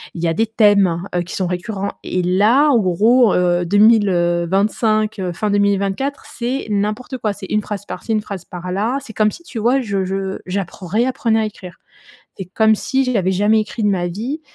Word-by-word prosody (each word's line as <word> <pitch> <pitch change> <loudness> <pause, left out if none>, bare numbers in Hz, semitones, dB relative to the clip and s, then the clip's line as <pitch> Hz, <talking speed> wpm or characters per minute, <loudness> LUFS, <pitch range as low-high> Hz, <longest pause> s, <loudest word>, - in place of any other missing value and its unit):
il 170 - -5
y - - +2
a 165 - +1
des 225 +7 0
thèmes, 200 -6 +3
heu, 175 - +1
qui 175 - -8
sont 185 - -1
récurrents 190 +3 -3
et 185 - -1
là, 215 +11 +3
en 255 -5 +4
gros, 215 +5 +3
heu, 175 0 +1
2000, 205 +3 +4
heu, 175 -1 +1
25, 215 +2 +1
heu, 180 -2 -3
fin 210 +5 -2
2024, 200 +7 0
c'est 250 +2 -3
n'importe 210 +5 -2
quoi. 215 -4 -2
C'est 195 - -9
une 210 - +1
phrase 205 -1 -6
par-ci, 225 - -6
une 215 - +1
phrase 200 -4 -7
par-là. 185 +8 -3
C'est 225 - -11
comme 215 0 +2
si, 345 - -12
tu 250 -8 -7
vois 245 +5 +2
je 200 -5 -2
je 190 0 -3
j'apprends 185 0 -5
réapprenais 230 +2 +1
à - - 0
écrire. 185 -5 -9 0.6
C'est 190 - -4
comme 220 +4 +3
si 265 +5 -1
j'avais 200 -7 0
jamais 205 +3 +3
écrit 215 +1 -5
de - - +3
ma 185 -3 0
vie 235 - -4
205 Hz, 205 wpm, -18 LUFS, 185-225 Hz, 0.6 s, en